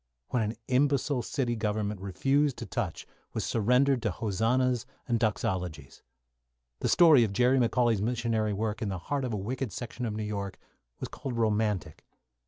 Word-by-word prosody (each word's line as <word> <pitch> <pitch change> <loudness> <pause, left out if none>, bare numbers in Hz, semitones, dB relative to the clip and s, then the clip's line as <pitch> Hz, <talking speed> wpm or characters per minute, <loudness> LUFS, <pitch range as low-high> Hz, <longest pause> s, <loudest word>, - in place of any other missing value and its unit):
What 125 - +1
an 110 +1 -1
imbecile 140 0 +2
city 120 0 -1
government 105 -2 -2
refused 135 +8 +1
to 115 - -5
touch 105 -10 -3 0.3
was - - -2
surrendered 125 +4 +3
to 110 - 0
hosannas 115 +5 0 0.2
and 120 -2 +1
doxologies. 90 - -2 0.8
The - - 0
story 160 -8 +7
of 105 -3 -1
Jerry 125 +5 +4
McCauley's 120 -3 +2
missionary 115 -1 0
work 105 +1 -2
in 110 - -1
the 95 - -2
heart 135 +9 -2
of 125 - -3
a 105 - -1
wicked 120 +4 -3
section 120 +4 -5
of 105 - -3
New 110 - -3
York 100 -2 -4 0.4
was - - -4
called 125 -3 -5
romantic. 105 -4 0
115 Hz, 165 wpm, -29 LUFS, 105-125 Hz, 0.8 s, story